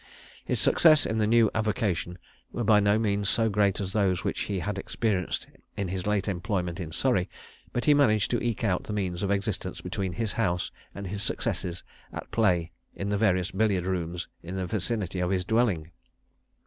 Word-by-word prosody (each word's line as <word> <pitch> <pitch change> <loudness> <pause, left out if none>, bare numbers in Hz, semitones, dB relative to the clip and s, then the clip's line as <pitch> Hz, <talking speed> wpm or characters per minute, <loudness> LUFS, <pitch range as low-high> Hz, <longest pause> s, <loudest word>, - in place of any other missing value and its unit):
His - - -1
successes 155 -3 +5
in 110 - -1
his 105 - +2
new 115 -1 +4
avocation 105 -5 -1 0.3
were 120 - -2
by 105 -1 +5
no 100 +1 +3
means 100 -2 +1
so 115 0 +3
great 100 -2 +2
as 95 -1 -3
those 95 -4 +1
which - - -2
he 100 - -1
had 95 +3 -3
experienced 95 -3 -1 0.3
in 100 -3 -2
his 95 +1 -3
late 105 -1 +1
employment 90 -2 -2
in 85 -4 -5
Surrey; 95 -2 +1 0.4
but 120 - -2
he 150 - +6
managed 110 -8 +3
to 120 - +1
eke 120 -2 -1
out 95 -5 +1
the 105 - -4
means 95 -4 -2
of 100 - -1
existence 100 0 -2
between 95 -2 -3
his 115 0 -2
house 90 -7 0 0.2
and 100 - -6
his 100 +2 -4
successes 90 -3 -2 0.3
at - - -8
play 90 -7 +2 0.2
in 100 - -3
the 105 - +1
various 95 -3 +2
billiard 95 -3 +1
rooms 90 -1 -2
in 90 +3 -6
the 95 -1 -2
vicinity 95 -1 -2
of 90 0 0
his 90 -1 0
dwelling. 100 -8 +1
100 Hz, 190 wpm, -27 LUFS, 90-110 Hz, 0.4 s, he